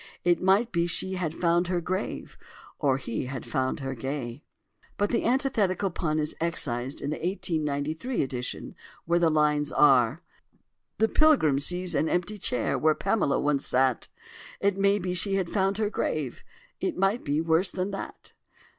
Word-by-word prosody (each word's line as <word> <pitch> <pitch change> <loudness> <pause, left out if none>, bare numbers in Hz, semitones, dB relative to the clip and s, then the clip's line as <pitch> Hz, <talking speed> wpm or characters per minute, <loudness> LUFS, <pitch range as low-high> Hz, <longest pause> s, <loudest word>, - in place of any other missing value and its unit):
It 175 0 +2
might 200 +6 +3
be 170 -1 +1
she 190 +2 -1
had 180 -4 -2
found 170 +1 +1
her 180 -1 0
grave 185 +4 -4 0.4
Or 135 -3 +2
he 125 -1 -4
had 130 -2 -6
found 130 +3 -1
her 135 0 -3
gay"; 130 0 -5 0.6
but 205 0 0
the 235 - 0
antithetical 225 -7 +1
pun 155 -2 -1
is 150 0 -1
excised 135 -5 -1
in 145 - -2
the 155 - -2
1893 160 - -1
edition, 125 -2 -5 0.3
where 170 +1 +2
the 170 -1 +4
lines 150 -1 +2
are: 135 +1 +4 0.7
"The 220 - +3
pilgrim 240 - +4
sees 180 +4 0
an 155 +2 +1
empty 180 +4 -1
chair 125 -9 0
Where 155 0 +3
Pamela 195 -7 +1
once 145 -1 0
sat: 130 -1 +1 0.5
It 200 -1 +2
may 200 +1 +3
be 180 -2 -3
she 195 +2 +1
had 190 -3 -1
found 195 -1 +1
her 215 -1 0
grave, 150 - -2 0.4
It - - -2
might 195 +5 +1
be 145 +1 0
worse 165 +3 +2
than 185 +2 -3
that." 195 - -7
170 Hz, 165 wpm, -27 LUFS, 145-195 Hz, 0.7 s, the